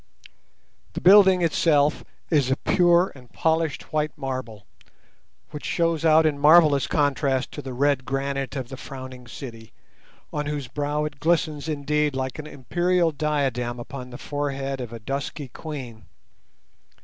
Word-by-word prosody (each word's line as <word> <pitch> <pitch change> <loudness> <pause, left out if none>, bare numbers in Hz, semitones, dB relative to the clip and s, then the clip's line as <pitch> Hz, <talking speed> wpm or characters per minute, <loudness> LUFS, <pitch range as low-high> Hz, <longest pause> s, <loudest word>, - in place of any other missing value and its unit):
The - - -3
building 190 -1 +7
itself 150 -2 +2 0.3
is 145 -5 +3
of 130 - -1
pure 175 0 +4
and 125 -3 -16
polished 160 -1 -1
white 155 -1 -1
marble, 130 -6 -5 0.9
which 150 -1 -7
shows 165 -2 0
out 160 0 +5
in 150 -2 +1
marvellous 150 -2 +6
contrast 140 -3 0
to 145 - -7
the 135 - -7
red 140 0 +2
granite 135 0 -3
of 130 -3 -4
the 130 - -7
frowning 130 -2 -9
city, 115 -2 -10 0.6
on 150 -1 -2
whose 145 -3 -3
brow 145 +3 -2
it 150 -2 -6
glistens 160 -1 0
indeed 150 -1 0
like 130 +2 -3
an 155 - -6
imperial 175 +5 0
diadem 135 -6 -1
upon 125 +1 -8
the 125 - -9
forehead 140 -2 -3
of 120 -2 -6
a 115 - -7
dusky 135 +4 -4
queen. 125 -6 -8
145 Hz, 145 wpm, -24 LUFS, 130-155 Hz, 0.9 s, building